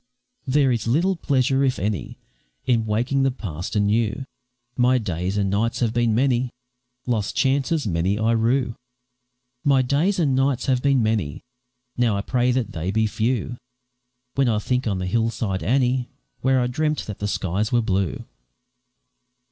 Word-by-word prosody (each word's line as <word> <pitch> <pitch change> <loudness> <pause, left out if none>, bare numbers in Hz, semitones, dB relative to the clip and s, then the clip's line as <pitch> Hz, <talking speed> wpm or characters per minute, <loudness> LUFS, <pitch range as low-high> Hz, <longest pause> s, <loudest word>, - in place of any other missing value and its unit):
There 135 0 +3
is 115 -2 -1
little 170 +11 +2
pleasure, 135 -4 +1
if 130 -2 +1
any, 100 - -3 0.5
In 115 -3 +1
waking 125 +6 +1
the 135 - +3
past 90 - -6
anew; 110 +5 +1 0.5
My 125 +1 +3
days 95 -3 -2
and 100 -1 +1
nights 110 +4 0
have 115 -2 +1
been 120 -2 +2
many; 125 0 +2 0.6
Lost 110 -5 -1
chances 140 +3 +1
many 90 +1 0
I 110 +1 +1
rue 115 +2 +1 0.9
My 135 -2 +4
days 150 +10 +1
and 145 -7 +2
nights 135 -1 +1
have 130 -2 +1
been 135 -3 +3
many; 105 -10 -1 0.5
Now 120 -4 +2
I - - -1
pray 125 +3 +1
that 125 -2 -1
they 85 +2 -4
be 110 +3 +1
few, 115 +2 -1 0.8
When 135 -2 +2
I 110 - +1
think 125 +4 -1
on 100 -3 0
the 90 - -3
hill 115 +4 +1
side, 100 -5 -3
Annie, 125 - +1 0.3
Where 130 0 +2
I - - +1
dreamt 150 +4 -1
that 105 - -7
the 105 - -2
skies 100 +2 -1
were 120 -1 +2
blue. 95 -5 -1
120 Hz, 165 wpm, -23 LUFS, 105-130 Hz, 0.9 s, My